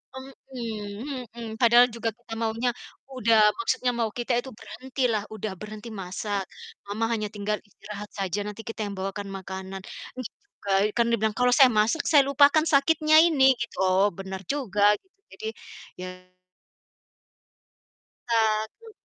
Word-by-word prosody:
Mhm 250 -2 -7
mhm, 235 0 -8
padahal 240 +1 +6
juga 230 -1 -2
kita 235 +1 -12
maunya, 230 +2 -1 0.5
udah, 230 -3 +4 0.2
maksudnya 250 -9 0
mau 230 -2 -1
kita 240 +2 -1
itu 265 +1 -7
berhentilah, 245 -2 -2
udah 215 -1 -4
berhenti 215 +3 -9
masak. 200 0 -4 0.4
"Mama 205 +3 -2
hanya 215 -2 -1
tinggal 210 0 -2
istirahat 205 0 -10
saja, 195 -1 -3
nanti 210 +1 -7
kita 225 -1 -4
yang 205 -1 -4
bawakan 195 +1 -4
makanan." 190 0 -6 0.3
terus 255 -3 -6
juga, 205 - -10 0.2
kan 235 -1 +3
dia 230 - +2
bilang, 220 -1 0
"Kalau 250 0 +4
saya 265 -3 +7
masak, 225 +10 +2
saya 280 -3 +6
lupakan 285 +3 +5
sakitnya 310 +2 +5
ini," 270 -6 +5
gitu. 235 - -5
Oh 190 +2 +4
benar 190 0 -6
juga 225 -8 -1 0.2
gitu 380 0 -39 0.2
jadi 440 - -7 0.5
ya 185 0 -9 2.0
Ta 230 -1 +3 0.4
mhm. 450 -1 -13
225 Hz, 145 wpm, -26 LUFS, 205-260 Hz, 2.0 s, saya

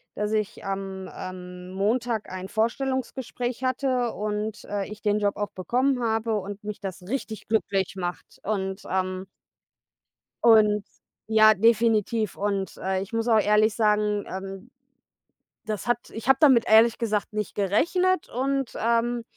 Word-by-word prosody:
dass 210 +1 -2
ich 215 +1 -2
am, 195 -1 -4
ähm, 180 0 -8
Montag 220 +3 -1
ein 185 +1 -6
Vorstellungsgespräch 250 +2 -2
hatte 255 -2 0
und, 210 +1 -4
äh, 200 -1 -3
ich 210 0 -9
den 210 -1 +1
Job 205 -1 0
auch 205 0 -3
bekommen 250 +6 0
habe 225 0 0
und 200 +1 -7
mich 210 -1 -5
das 190 -2 -6
richtig 220 0 -5
glücklich 195 -3 0
macht 180 -2 -6
und, 190 -1 -2
ähm 185 0 -2 1.2
und 210 -3 +5 0.4
ja, 215 0 +6
definitiv 225 0 +2
und, 200 -1 -2
äh, 190 0 -1
ich 200 +4 -8
muss 230 +1 0
auch 220 -2 +5
ehrlich 210 +1 +3
sagen, 210 -2 +1
ähm, 195 +4 -7 0.9
das 215 0 -4
hat 240 -1 +2
ich 225 +2 -7
habe 270 0 +6
damit 260 -6 +6
ehrlich 220 +1 +6
gesagt 215 -4 -1
nicht 210 -1 -3
gerechnet 340 - +1
und, 270 +1 -1
ähm, 235 +1 +1
215 Hz, 145 wpm, -25 LUFS, 195-235 Hz, 1.2 s, ja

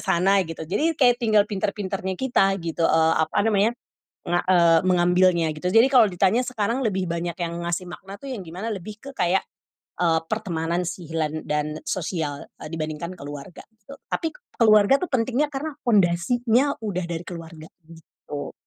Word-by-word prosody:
sana 195 +3 +3
gitu 160 -1 -6
jadi 300 - 0
kayak 245 -2 +4
tinggal 215 -3 +4
pinter-pinternya 195 -2 -3
kita 195 -7 +2
gitu, 165 -1 -2
eee, 160 0 +3
apa 160 - +1
namanya. 215 +1 +3 0.6
Nga 175 0 +2
eee, 170 -3 +5
mengambilnya 180 -1 +3
gitu, 180 +4 -2
jadi 230 +5 +6
kalau 255 -4 +6
ditanya 190 +8 +2
sekarang 240 +2 -1
lebih 190 -4 0
banyak 170 +1 -2
yang 170 -1 -3
ngasih 175 +1 -2
makna 195 +3 -9
tuh 275 - -8
yang 225 -8 -5
gimana 180 +7 -6
lebih 210 +1 -6
ke 275 - -9
kayak, 180 +2 +2 0.6
eee, 165 -2 +3
pertemanan 170 -4 -2
si 175 -1 -6
hilan 155 -1 -3
dan 150 +1 -2
sosial, 160 -5 -3
eee, - - -9
dibandingkan 155 +2 -4
keluarga 145 +1 -9
gitu, 220 +5 -14 0.2
tapi 325 -1 -2 0.2
keluarga 215 +2 +5
tuh 365 - -5
pentingnya 255 +4 +1
karena 290 +2 -5
pondasinya 230 +7 +2
udah 200 -5 -3
dari 170 0 -5
keluarga, 165 -2 -9 0.2
gitu. 160 -3 -9
185 Hz, 160 wpm, -24 LUFS, 165-220 Hz, 0.6 s, jadi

